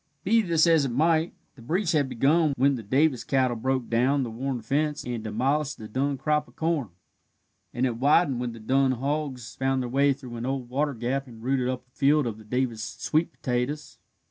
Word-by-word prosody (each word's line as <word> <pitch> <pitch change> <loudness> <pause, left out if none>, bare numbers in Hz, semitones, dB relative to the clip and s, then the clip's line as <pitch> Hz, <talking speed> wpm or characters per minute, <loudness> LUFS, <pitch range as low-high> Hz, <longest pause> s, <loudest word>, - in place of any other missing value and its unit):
Be 225 +4 +4
this 170 -5 +3
as 165 -4 +4
it - - -1
might, 160 +5 +2 0.2
the 130 - -15
breach 170 - 0
had 145 -5 +1
begun 150 +5 +2
when 140 +3 +4
the 125 - -4
Davis 130 +4 +1
cattle 130 -3 +1
broke 130 +1 -1
down 130 +4 +2
the 120 - -4
worn 130 +2 -3
fence 145 +5 0
and 120 -3 -4
demolished 135 +7 -1
the 110 - -8
Dun 135 +5 -1
crop 150 +3 0
of - - -21
corn, 160 -8 -1 0.8
and 125 +2 0
it 120 -3 -1
widened 140 0 +3
when 125 -1 -2
the 115 - -10
Dun 130 +4 +2
hogs 135 -3 -3
found 135 -1 0
their 125 - -4
way 140 +3 +3
through 130 -3 -6
an 115 - -4
old 130 -2 -3
water 140 +2 -1
gap 130 +4 -2
and 115 -2 -13
rooted 130 0 0
up 130 -1 -4
a - - -37
field 145 +1 +3
of 110 -2 -4
the - - -12
Davis 120 0 -2
sweet 155 +7 -1
potatoes. 130 +5 -3
135 Hz, 210 wpm, -26 LUFS, 120-150 Hz, 0.8 s, Be